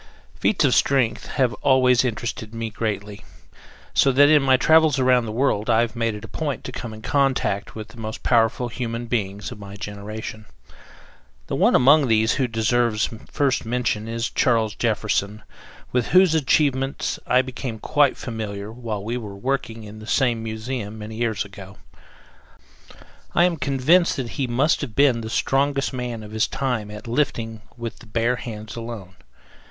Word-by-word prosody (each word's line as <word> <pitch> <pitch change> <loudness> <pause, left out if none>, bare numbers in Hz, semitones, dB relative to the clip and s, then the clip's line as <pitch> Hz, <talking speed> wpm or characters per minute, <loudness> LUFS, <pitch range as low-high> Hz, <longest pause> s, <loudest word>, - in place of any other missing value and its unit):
Feats 185 -7 +1
of 130 - +3
strength 125 -5 +2
have 130 -4 +1
always 130 -2 +4
interested 115 -1 -4
me 115 -1 -4
greatly, 105 -2 -4 0.7
so 135 - +4
that 145 +2 +6
in 155 -1 +6
my 130 -1 +4
travels 160 0 +4
around 125 -2 +3
the - - -4
world 115 -2 0
I 115 0 +4
have 120 0 -2
made 115 -2 -1
it 105 - -8
a - - -9
point 150 -4 -3
to - - -6
come 120 -2 -6
in 110 0 -11
contact 135 -8 0
with 110 0 -7
the 115 +1 -14
most 110 0 -6
powerful 120 +1 +2
human 115 0 -4
beings 105 -4 -3
of - - -9
my 100 0 -9
generation. 105 +1 -7 1.0
The - - -3
one - - +4
among 140 +3 +6
these 110 0 +3
who 130 -2 0
deserves 115 -1 +1 0.2
first 140 -2 +1
mention 115 -2 -1
is 115 +1 -3
Charles 115 -3 +2
Jefferson, 105 -2 -1 0.5
with 125 -2 0
whose 185 -2 +5
achievements 140 -3 +1
I 125 +1 +4
became 125 -2 -5
quite 145 +4 +2
familiar 105 -3 -5
while 110 -4 -5
we 115 +3 -2
were 105 -5 -7
working 115 -1 -3
in 105 +1 -10
the 110 - -11
same 120 -4 +1
museum 110 -1 -5
many 110 +1 -8
years 110 -3 -1
ago. 95 -1 -12 1.6
I 170 - +5
am 180 -1 +3
convinced 150 +5 +3
that 125 -3 -4
he 135 0 -2
must 130 +6 +2
have 130 -7 -5
been 135 -5 +4
the 110 - -6
strongest 140 +3 0
man 120 -3 -4
of 105 - -10
his 110 0 +1
time 125 -6 -2
at 105 +3 -9
lifting 115 -4 -1 0.2
with 115 -1 -6
the 120 - -15
bare 115 +3 0
hands 110 -3 -7
alone. 115 -5 -7
115 Hz, 170 wpm, -23 LUFS, 110-130 Hz, 1.6 s, that